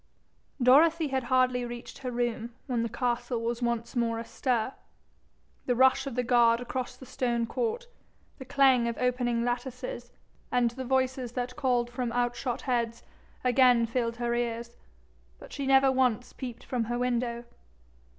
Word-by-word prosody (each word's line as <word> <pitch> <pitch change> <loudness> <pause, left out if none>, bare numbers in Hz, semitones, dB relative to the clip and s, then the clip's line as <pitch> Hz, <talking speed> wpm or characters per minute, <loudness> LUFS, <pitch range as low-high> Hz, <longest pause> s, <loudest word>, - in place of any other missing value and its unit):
Dorothy 305 +5 +5
had 265 -2 -1
hardly 255 0 +2
reached 240 0 -8
her 255 - -4
room 235 -1 -2
when 245 -4 -1
the 230 - -1
castle 240 0 -1
was 235 +1 -2
once 235 0 -2
more 230 -1 +1
astir. 235 +1 -1 0.9
The 245 - +2
rush 265 +2 +4
of 265 - -5
the 250 - 0
guard 235 -1 +4
across 250 +1 -4
the 260 - -12
stone 240 -2 -1
court, 470 - -2 0.5
the 265 - -8
clang 265 -3 +4
of 235 - -3
opening 245 -2 0
lattices, 250 - -4 0.4
and 245 -2 +2
the 260 +2 -6
voices 260 -1 0
that 250 0 -3
called 245 -4 0
from 245 -1 -2
out 245 0 0
shot 245 -2 -3
heads, 235 -2 -1 0.4
again 250 -2 +5
filled 230 0 -1
her 240 0 -1
ears, 235 0 -3 0.6
but - - -13
she 280 -2 -3
never 270 0 +5
once 250 -2 +1
peeped 245 -2 -7
from 245 -3 -2
her 240 +2 -2
window. 240 -1 -1
245 Hz, 160 wpm, -28 LUFS, 235-260 Hz, 0.9 s, Dorothy